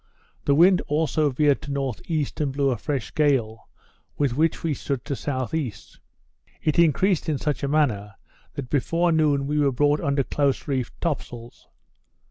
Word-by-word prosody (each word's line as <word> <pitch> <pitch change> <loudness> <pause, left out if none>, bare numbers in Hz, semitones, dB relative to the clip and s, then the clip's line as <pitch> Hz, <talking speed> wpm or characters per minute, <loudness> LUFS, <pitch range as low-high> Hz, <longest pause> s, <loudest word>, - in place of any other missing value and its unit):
The 140 - +3
wind 180 +4 +5
also 155 0 +1
veered 145 +1 +2
to 145 - -8
N.E. 140 +3 -2
and 145 -3 -1
blew 140 0 +1
a 120 - -1
fresh 140 -4 -3
gale, 130 -8 0 0.5
with 140 -5 0
which 160 +3 +1
we 165 -2 0
stood 140 -1 -4
to 145 - -3
S.E. 130 -1 -2 0.9
It 155 +1 +1
increased 170 +2 +3
in 150 - 0
such 150 +1 -2
a 140 - -1
manner, 115 -10 0 0.4
that 130 -3 -6
before 165 +5 +1
noon 150 -3 +2
we 150 +2 0
were 140 -2 +3
brought 145 +3 +2
under 140 -1 +1
close 140 0 -1
reefed 130 -4 -3
top 165 -4 0
sails. 120 -1 -12
145 Hz, 165 wpm, -24 LUFS, 130-155 Hz, 0.9 s, wind